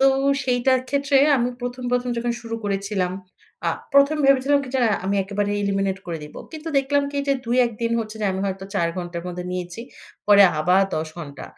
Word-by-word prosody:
তো 270 - +6 0.4
সেইটার 255 0 +2
ক্ষেত্রে 280 0 +2 0.2
আমি 240 0 +1
১ম, 245 +1 -5
১ম 250 0 0
যখন 235 +1 -1
শুরু 230 -1 -6
করেছিলাম 195 -2 -1 0.6
আ - - +2 0.2
১ম 280 +2 +5
ভেবেছিলাম 275 +1 +4
কি? - - -9
যে - - +2
আ - - +1
আমি 200 +1 0
একেবারে 205 +1 -2
এলিমিনেট 195 -1 0
করে 170 -2 -4
দিবো। 150 - -10
কিন্তু 315 +1 -7
দেখলাম 285 +1 +1
কি - - -13
এই - - -4
যে 275 - +4
২-১ 240 +1 +2
দিন 230 0 0
হচ্ছে 220 0 -6
যে - - +2
আমি 190 - -3
হয়তো 190 0 -4
৪ 170 -4 +1
ঘন্টার 175 -1 -5
মধ্যে 180 0 -5
নিয়েছি। 180 +2 -5 0.5
পরে 205 -1 +8 0.2
আবার 180 +5 +4
১০ 155 0 -2
ঘন্টা। 145 -4 -8
215 Hz, 200 wpm, -23 LUFS, 185-260 Hz, 0.6 s, পরে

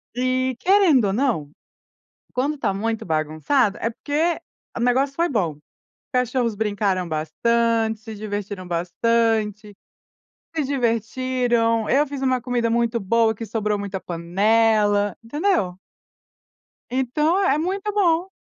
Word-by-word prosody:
E, 255 0 0
querendo 365 - +4
ou 195 - 0
não, 220 - 0 0.8
quando 285 +4 -1
tá 210 -7 0
muito 225 +3 -2
bagunçado, 155 - +1
é 230 - 0
porque 305 +8 -1 0.4
o - - -3
negócio 260 +3 +2
foi 340 +1 +2
bom. 180 - -1 0.6
Cachorros 245 -3 0
brincaram 200 -4 0
bastante, 225 +8 0
se 220 -1 -8
divertiram 205 -3 -5
bastante. 210 +4 0 0.8
Se 310 - +1
divertiram, 235 -2 0
eu 290 +3 +3
fiz 275 -1 -6
uma 260 -2 +1
comida 245 -1 0
muito 235 0 +1
boa, 220 +2 +2
que 225 - -6
sobrou 210 -1 -1
muita 200 -1 -4
panela, 205 +4 +2
entendeu? 235 - 0 1.1
Então, 300 +8 +1
é 295 -7 +3
muito 385 +6 -2
bom. 360 -3 +2
230 Hz, 120 wpm, -22 LUFS, 205-260 Hz, 1.1 s, querendo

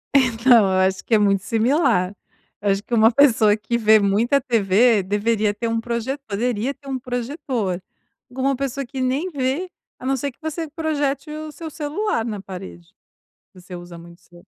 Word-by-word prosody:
Então 245 -3 +5
eu 190 -1 +1
acho 190 0 -4
que 230 - +3
é - - +6
muito 200 -2 +2
similar, 230 - +1 0.5
eu 205 - 0
acho 195 +1 -1
que 230 - -8
uma 225 0 +5
pessoa 225 -6 +5
que 220 +2 -2
vê 220 -1 +5
muita 220 +8 +2
TV 225 -2 +3
deveria 210 +1 0
ter 230 +3 -3
um 225 0 0
proje 235 +4 -3
poderia 230 +4 -1
ter 280 - -18
um 260 -1 -2
projetor, 245 - -3 0.5
agora 260 +2 -2
uma 275 - +1
pessoa 275 0 -3
que 265 +2 -7
nem 265 +8 0
vê, 280 +5 -2 0.3
a - - -11
não 270 0 +1
ser 280 +3 -3
que - - -35
você 315 +1 -4
projete 300 -2 -2
o 310 0 -6
seu 320 +1 -8
celular 305 - -2
na 210 -4 -4
parede, 90 - -10 0.6
você 180 0 -11
usa 175 -1 -10
muito 170 +1 -14
celu 175 -1 -19
235 Hz, 185 wpm, -21 LUFS, 205-275 Hz, 0.6 s, é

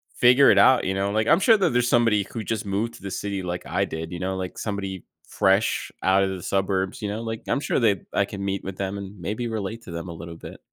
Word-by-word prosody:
figure 125 +3 +6
it - - +3
out, 130 -1 +6
you 95 - 0
know? 100 +1 -1
Like, 110 +1 0
I'm 170 - +5
sure 225 +2 +6
that 195 - +2
there's 120 0 +2
somebody 115 -5 +3
who 115 -2 -4
just 110 -1 -3
moved 105 +4 -2
to - - -14
the 100 - -5
city 100 0 -3
like 90 0 -4
I - - 0
did, 80 0 -6
you 90 - -5
know, 95 +1 -2
like 95 -1 -5
somebody 100 -3 -4 0.2
fresh 95 +2 +1
out 95 +1 +4
of 95 - 0
the 90 -3 -6
suburbs, 95 0 -1
you 105 - -2
know, 110 +2 -3
like 115 -1 -4
I'm 140 - +1
sure 145 - 0
they 105 -6 +2
I 100 - +2
can 100 0 -7
meet 100 -1 -2
with 95 -1 -6
them, 100 0 -3
and 100 0 -8
maybe 105 +8 -3
relate 110 0 -4
to 90 - -10
them 85 +2 -5
a - - -6
little 85 0 -8
bit. - - -10
100 Hz, 270 wpm, -24 LUFS, 95-115 Hz, 0.2 s, figure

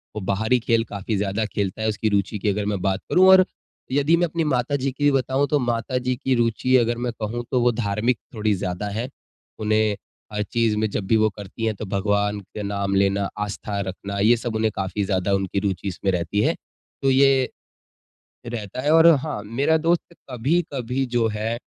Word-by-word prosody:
वो 105 - -3
बाहरी 110 +6 +1
खेल 115 0 +1
काफ़ी 100 +2 -3
ज़्यादा 100 +2 -1
खेलता 100 -1 -3
है 110 - 0
उसकी 110 +1 -1
रुचि 100 0 0
की 105 - 0
अगर 100 +1 -1
मैं 100 -2 -2
बात 95 +1 0
करूँ। 185 +1 +5
और 190 0 +8 0.5
यदि 145 +4 +3
मैं 175 - +2
अपनी 165 +1 -2
माता 135 -2 0
जी 135 -1 -1
की 145 +2 +2
बताऊँ, 135 +1 +1
तो 150 - +2
माता 120 0 -1
जी 125 0 -1
की 130 +1 0
रुचि 120 +2 +2
अगर 120 -1 +1
मैं 120 0 -2
कहूँ 115 +3 -3
तो 125 -2 +2
वो 120 0 +4
धार्मिक 110 +1 0 0.2
थोड़ी 110 -1 +1
ज़्यादा 90 +1 -3
हैं। 115 +5 -3 0.5
उन्हें 110 0 +2 0.4
हर 105 0 0
चीज़ 115 0 0
में 110 0 0
जब 100 - -3
भी 115 - +3
वो 110 0 +3
करती 105 +2 -7
हैं 110 -1 0
तो 110 - -6
भगवान 105 +1 0
के 105 +2 -8
नाम 100 -1 -1
लेना, 100 0 +2
आस्था 105 0 -3
रखना, 100 +1 -5
ये 115 +4 +5
सब 115 -1 -4
उन्हें 110 0 +1
काफ़ी 95 +2 -2
ज़्यादा 95 0 0
उनकी 95 0 0
रुचि 100 -1 -2
इसमें 95 +1 -1
रहती 90 +3 -1
है। - - +2 0.5
तो 135 - +2
ये, 135 -1 +4 1.0
रहता 115 -1 -5
है 145 - 0
और 165 +1 +7
हाँ, 140 -5 -4
मेरा 135 +9 +1
दोस्त 170 +2 0 0.2
कभी-कभी 135 -1 -1
जो 120 -2 +1
है 110 +2 -2
110 Hz, 200 wpm, -23 LUFS, 100-125 Hz, 1.0 s, और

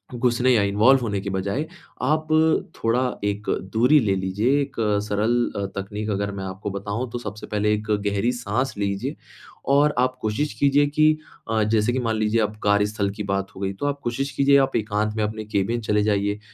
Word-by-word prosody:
घुसने 120 +1 +2
या 110 - +4
इन्वॉल्व 105 +7 +4
होने 105 -4 -1
के 100 - -4
बजाए, 100 +10 -2 0.4
आप 155 +4 +1 0.5
थोड़ा 115 +2 +1 0.2
एक 105 0 -2 0.2
दूरी 125 +7 +5
ले 100 -4 +1
लीजिए, 100 +9 +1
एक 140 -1 -5 0.3
सरल 105 +3 +1 0.2
अ, 100 - -1
तकनीक 105 +2 -4
अगर 100 0 -1
मैं - - -4
आपको 95 +2 -5
बताऊँ, 100 +5 -4
तो 120 - -3
सबसे 105 -2 -7
पहले 105 0 +1
एक 105 +1 -3 0.2
गहरी 100 +4 +1
साँस 125 +1 -2
लीजिए, 100 -1 -2 0.5
और 145 +2 +4
आप 130 0 +2
कोशिश 110 +6 -1
कीजिए 140 +1 +4
कि 155 +1 +4 0.4
अ, 110 -1 +2
जैसे 110 +2 +1
कि 130 - 0
मान 115 -3 -1
लीजिए 110 +1 +1
अब 105 0 -1
कार्यस्थल 105 0 +1
की 105 - -3
बात 100 -1 -3
हो 95 - -9
गई, 95 0 -1
तो 100 - -5
आप 145 0 -2
कोशिश 135 +4 -2
कीजिए 140 0 +4
आप - - -10
एकांत 105 0 -1
में 110 - +1
अपने 110 +1 -3
केबिन 105 +3 -1
चले 105 -1 +1
जाइए। 100 0 0
105 Hz, 195 wpm, -23 LUFS, 100-125 Hz, 0.5 s, दूरी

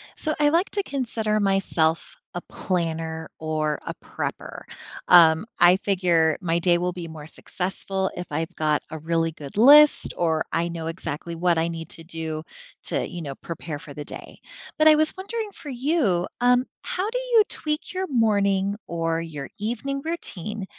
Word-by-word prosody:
So 310 - -2
I 295 -1 +5
like 335 +5 +2
to 405 - 0
consider 225 - -1
myself 195 -5 +1 0.2
a 175 - -3
planner 165 -3 -3
or 155 -1 -1
a - - -4
prepper, - - -5 0.5
um, 165 0 +7
I 175 +1 +7
figure 175 -5 +2
my 170 -2 +1
day 175 0 +3
will 180 +1 0
be 175 -2 -6
more 155 -2 -9
successful 190 +3 -3
if 180 - -4
I've 165 +4 -3
got 150 -1 +1
a 160 - -4
really 165 +1 0
good 145 -3 -10
list 290 +6 +7
or 160 -2 +1
I 165 +1 0
know 165 -1 -5
exactly 165 0 -5
what 175 0 +2
I 165 - +1
need 165 -1 -6
to 165 - -10
do 160 -2 -5 0.4
to, - - -1
you 175 - -7
know, 140 -4 -5
prepare 165 -2 -6
for 145 -1 -11
the 150 - -6
day, - - -9 0.4
but 310 - +6
I 310 - +8
was 310 +1 +1
wondering 425 +2 -4
for 300 - -10
you, 250 - +1 0.2
um, 245 +1 +4 0.2
how 370 +3 -2
do - - -2
you - - +4
tweak 300 +3 -3
your 375 0 -2
morning 200 - +2
or 165 -1 -1
your 150 -4 -7
evening 245 +6 -3
routine 215 - -4
180 Hz, 175 wpm, -24 LUFS, 165-245 Hz, 0.5 s, I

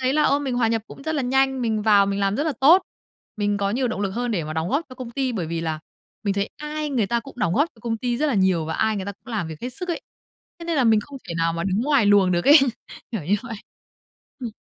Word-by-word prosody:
thấy 260 0 +1
là, 305 - +3
ơ, 280 - +3
mình 275 -3 -2
hòa 240 -2 +2
nhập 225 -1 0
cũng - - -12
rất 315 +2 -2
là 285 - 0
nhanh, 265 +1 +1
mình 220 -2 0
vào 205 -2 +5
mình 200 0 -1
làm 195 +1 +1
rất 290 - 0
là 315 - 0
tốt. 335 +8 +7 0.5
Mình 205 -1 0
có 200 0 0
nhiều 250 +4 0
động 220 - -3
lực 200 -1 -1
hơn 240 +4 -2
để 175 -7 -1
mà 155 - -5
đóng 160 +2 -2
góp 290 - 0
cho 255 - -11
công 255 -2 -7
ty 260 +1 -1
bởi 185 -8 -3
vì 165 +1 -3
là 160 -1 -3 0.4
mình 200 -1 +1
thấy 200 +1 -1
ai 300 0 -4
người 240 -7 +1
ta 235 +3 0
cũng 275 - -12
đóng 170 -7 +1
góp 295 +4 +3
cho - - -23
công 230 0 -2
ty 240 +1 -1
rất 305 - +1
là 285 - +1
nhiều, 190 -5 +2
và 160 +1 -3
ai 220 -1 +1
người 195 - -3
ta 200 - -3
cũng 200 - -32
làm 180 -7 -2
việc 160 -1 -8
hết 250 - -3
sức 360 +8 -6
ấy, 340 - -2 0.6
thế 335 - -8
nên 335 -1 -1
là 265 - +3
mình 220 -2 +5
không 275 +4 -10
thể 170 - -4
nào 165 0 +1
mà 170 0 -3
đứng 195 +2 0
ngoài 275 -5 +3
luồng 200 -2 +5
được 175 0 0
ấy. 295 +3 +9 0.5
Kiểu 210 -9 -3
như 185 +7 +2
vậy. 230 -2 -6 0.8
Ừm. 240 - -4
225 Hz, 305 wpm, -23 LUFS, 195-270 Hz, 0.8 s, ấy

